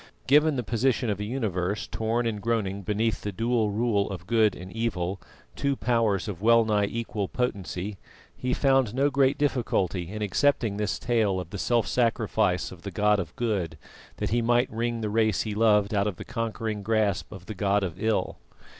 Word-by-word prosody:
Given 150 Hz, +2 st, +4 dB
the 125 Hz, -, -1 dB
position 115 Hz, 0 st, +1 dB
of 100 Hz, -, -3 dB
a -, -, -2 dB
universe 105 Hz, -5 st, -2 dB
torn 115 Hz, +2 st, -1 dB
and 110 Hz, -3 st, -2 dB
groaning 100 Hz, -3 st, -1 dB
beneath 105 Hz, +3 st, -1 dB
the 105 Hz, -, -3 dB
dual 115 Hz, +1 st, +1 dB
rule 105 Hz, -1 st, +1 dB
of 90 Hz, -3 st, -6 dB
Good 110 Hz, -1 st, +3 dB
and 90 Hz, +1 st, -9 dB
Evil, 100 Hz, -5 st, -2 dB, 0.3 s
two 140 Hz, 0 st, 0 dB
powers 115 Hz, -7 st, +1 dB
of 95 Hz, -3 st, -5 dB
well 115 Hz, +1 st, +5 dB
nigh 105 Hz, -2 st, +2 dB
equal 110 Hz, -3 st, -3 dB
potency, 100 Hz, -4 st, -3 dB, 0.4 s
he 125 Hz, -, -3 dB
found 135 Hz, -4 st, +2 dB
no 140 Hz, +2 st, +2 dB
great 140 Hz, 0 st, +3 dB
difficulty 100 Hz, -, 0 dB
in 105 Hz, +1 st, -4 dB
accepting 115 Hz, -1 st, +1 dB
this 105 Hz, 0 st, -1 dB
tale 110 Hz, -6 st, +1 dB
of 90 Hz, -1 st, -7 dB
the 100 Hz, -, -5 dB
self 120 Hz, +1 st, +2 dB
sacrifice 110 Hz, -5 st, +1 dB
of 90 Hz, -2 st, -11 dB
the 100 Hz, -, -5 dB
God 105 Hz, +2 st, +2 dB
of 85 Hz, -5 st, -5 dB
Good 95 Hz, -9 st, -1 dB, 0.4 s
that -, -, -2 dB
He 120 Hz, +1 st, +2 dB
might 120 Hz, +2 st, +2 dB
wring 115 Hz, +1 st, -2 dB
the 105 Hz, -, -1 dB
race 110 Hz, -2 st, +2 dB
He 110 Hz, -, -3 dB
loved 105 Hz, -1 st, +3 dB
out 100 Hz, 0 st, +2 dB
of 100 Hz, -, -2 dB
the -, -, -9 dB
conquering 110 Hz, -2 st, -3 dB
grasp 110 Hz, -2 st, 0 dB
of 95 Hz, -4 st, -10 dB
the 110 Hz, -, -6 dB
god 100 Hz, +1 st, +1 dB
of 90 Hz, 0 st, -5 dB
Ill. 110 Hz, -1 st, 0 dB
110 Hz, 190 wpm, -27 LUFS, 100-115 Hz, 0.4 s, well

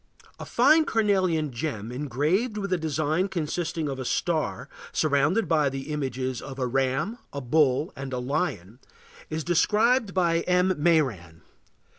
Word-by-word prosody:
A -, -, -6 dB
fine 315 Hz, 0 st, +4 dB
carnelian 185 Hz, -, +1 dB
gem 115 Hz, -4 st, -4 dB
engraved 150 Hz, -, -1 dB
with 200 Hz, -2 st, -2 dB
a -, -, +2 dB
design 155 Hz, +3 st, 0 dB
consisting 165 Hz, -2 st, -3 dB
of 135 Hz, -2 st, -4 dB
a -, -, -3 dB
star 160 Hz, +4 st, -1 dB, 0.2 s
surrounded 155 Hz, +8 st, +1 dB
by 155 Hz, -4 st, +2 dB
the 135 Hz, +2 st, -6 dB
images 130 Hz, -3 st, -3 dB
of 135 Hz, -2 st, -8 dB
a 130 Hz, -, -1 dB
ram, 135 Hz, -, -1 dB
a 140 Hz, -, -4 dB
bull, 140 Hz, +3 st, +1 dB
and 135 Hz, -1 st, -6 dB
a 125 Hz, -, -2 dB
lion, 125 Hz, -, -3 dB, 0.5 s
is 155 Hz, 0 st, -3 dB
described 210 Hz, -, +2 dB
by 170 Hz, -2 st, +2 dB
M. 180 Hz, +1 st, +3 dB
Mairan. 125 Hz, -, 0 dB
155 Hz, 145 wpm, -26 LUFS, 130-180 Hz, 0.5 s, fine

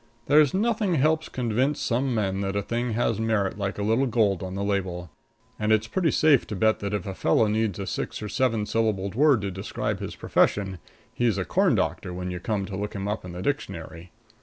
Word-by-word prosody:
There's 150 Hz, -1 st, +5 dB
nothing 210 Hz, -2 st, +1 dB
helps 155 Hz, +2 st, +2 dB
convince 125 Hz, +4 st, 0 dB
some 125 Hz, +1 st, 0 dB
men 100 Hz, -2 st, 0 dB
that 95 Hz, 0 st, -2 dB
a 100 Hz, -, 0 dB
thing 120 Hz, +2 st, -2 dB
has 115 Hz, -1 st, 0 dB
merit 105 Hz, -3 st, 0 dB
like 100 Hz, 0 st, -2 dB
a 100 Hz, -, -2 dB
little 115 Hz, +6 st, +2 dB
gold 105 Hz, -6 st, +2 dB
on 95 Hz, 0 st, -5 dB
the 100 Hz, -, -2 dB
label. 90 Hz, -4 st, -2 dB, 0.5 s
And 105 Hz, 0 st, 0 dB
it's 110 Hz, 0 st, +3 dB
pretty 165 Hz, +9 st, 0 dB
safe 150 Hz, -5 st, +4 dB
to 105 Hz, -, -4 dB
bet 110 Hz, +3 st, +2 dB
that 100 Hz, 0 st, -2 dB
if 100 Hz, -, -3 dB
a 95 Hz, -, -4 dB
fellow 95 Hz, +4 st, +2 dB
needs 105 Hz, -2 st, 0 dB
a 100 Hz, -, -4 dB
six -, -, -4 dB
or 105 Hz, -, -5 dB
seven 115 Hz, -1 st, 0 dB
syllabled 105 Hz, -4 st, 0 dB
word 140 Hz, -1 st, +4 dB
to 100 Hz, -1 st, -3 dB
describe 95 Hz, +2 st, -3 dB
his -, -, -6 dB
profession, 95 Hz, -3 st, +1 dB, 0.3 s
he's 115 Hz, -5 st, +1 dB
a 95 Hz, -, -1 dB
corn -, -, +2 dB
doctor 90 Hz, -, -2 dB
when 90 Hz, 0 st, -4 dB
you 90 Hz, -, -4 dB
come 100 Hz, +2 st, -2 dB
to 95 Hz, -, -6 dB
look 105 Hz, +2 st, -4 dB
him 100 Hz, 0 st, -3 dB
up 105 Hz, +1 st, -3 dB
in 90 Hz, -1 st, -8 dB
the 90 Hz, +1 st, -6 dB
dictionary. 85 Hz, -1 st, -4 dB
105 Hz, 220 wpm, -26 LUFS, 95-120 Hz, 0.5 s, There's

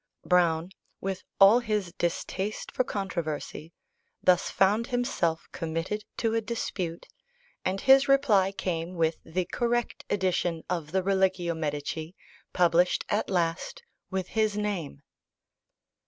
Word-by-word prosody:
Browne, 175 Hz, -1 st, +2 dB, 0.3 s
with 190 Hz, -1 st, -3 dB, 0.2 s
all 200 Hz, +4 st, +8 dB
his 210 Hz, -7 st, -2 dB
distaste 190 Hz, +4 st, -3 dB
for 255 Hz, -, +1 dB
controversy, 170 Hz, -7 st, -4 dB, 0.5 s
thus 180 Hz, -1 st, +4 dB
found 210 Hz, +5 st, +2 dB
himself 245 Hz, -10 st, -1 dB
committed 165 Hz, +6 st, -3 dB
to 225 Hz, -1 st, 0 dB
a 225 Hz, -, +1 dB
dispute, 190 Hz, -7 st, -4 dB, 0.6 s
and 190 Hz, +1 st, -1 dB
his 270 Hz, +1 st, +6 dB
reply 225 Hz, -9 st, +4 dB
came 175 Hz, -2 st, -3 dB
with 165 Hz, -1 st, +1 dB
the 180 Hz, +2 st, -2 dB
correct 240 Hz, +4 st, -1 dB
edition 180 Hz, -4 st, 0 dB
of 165 Hz, -4 st, -2 dB
the 190 Hz, +1 st, +1 dB
Religio 190 Hz, -3 st, +1 dB
Medici 155 Hz, +2 st, -4 dB, 0.4 s
published 175 Hz, 0 st, +3 dB
at 210 Hz, -, 0 dB
last 175 Hz, -, -1 dB, 0.3 s
with 190 Hz, -2 st, -3 dB
his 215 Hz, -2 st, +1 dB
name. 185 Hz, -9 st, -3 dB
185 Hz, 120 wpm, -28 LUFS, 170-210 Hz, 0.6 s, all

